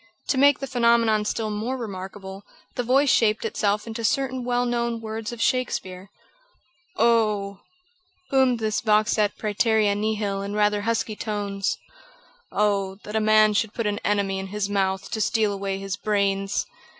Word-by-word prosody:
To 270 - +2
make 285 0 +6
the 275 - -5
phenomenon 235 -4 +2
still 215 0 -2
more 225 +5 -3
remarkable, 195 -3 -7 0.3
the - - -2
voice 265 +3 +3
shaped 220 -1 +2
itself 210 -1 0
into 230 0 -6
certain 260 +2 0
well 245 0 0
known 235 -1 -1
words 220 0 -5
of 240 - -8
Shakespeare: 195 -7 -1 0.9
"Oh!" 210 -4 +2 0.7
boomed 260 -2 +3
this 215 -2 -1
vox 215 0 +2
et 205 -1 +1
præterea 215 -1 +1
nihil 205 -2 -1
in 200 +1 -4
rather 210 0 +2
husky 225 0 -1
tones, 205 -2 -2 0.7
"Oh! 200 -2 0
that 210 - -7
a - - +3
man 215 0 +5
should 210 +1 -1
put 230 - -2
an 205 0 -1
enemy 200 -2 0
in 190 - -5
his 205 0 -2
mouth 190 -1 -1
to 220 - -2
steal 215 0 +1
away 195 -1 -3
his 195 0 -4
brains!" 200 -1 0
215 Hz, 160 wpm, -24 LUFS, 200-230 Hz, 0.9 s, make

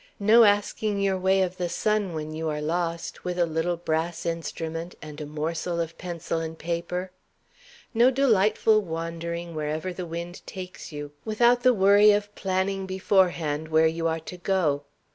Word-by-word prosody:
No 220 +3 +7
asking 205 0 +1
your 195 -1 +1
way 190 +1 +3
of 185 0 -3
the 175 -2 -2
sun, 210 -1 0
when 155 0 -4
you 160 0 -2
are 150 0 -2
lost, 165 +2 -3
with 180 0 -3
a 175 - +3
little 165 +2 -1
brass 165 0 -2
instrument 165 0 -4
and 150 0 -9
a 150 - -5
morsel 160 +3 -3
of 165 0 -3
pencil 170 -2 -3
and 160 0 -5
paper. 175 +2 -3 0.8
No 240 +2 +5
delightful 220 -4 +3
wandering 170 0 -5
wherever 155 +4 -3
the 180 0 -6
wind 170 +2 -6
takes 185 -2 -8
you, 145 -1 -6
without 235 +3 +3
the 255 0 +6
worry 205 -1 +6
of 205 0 +2
planning 190 0 -1
beforehand 180 -5 +1
where 160 0 +4
you 165 +1 +1
are 165 0 -1
to 180 +3 -8
go. 170 -6 0
175 Hz, 165 wpm, -26 LUFS, 160-195 Hz, 0.8 s, No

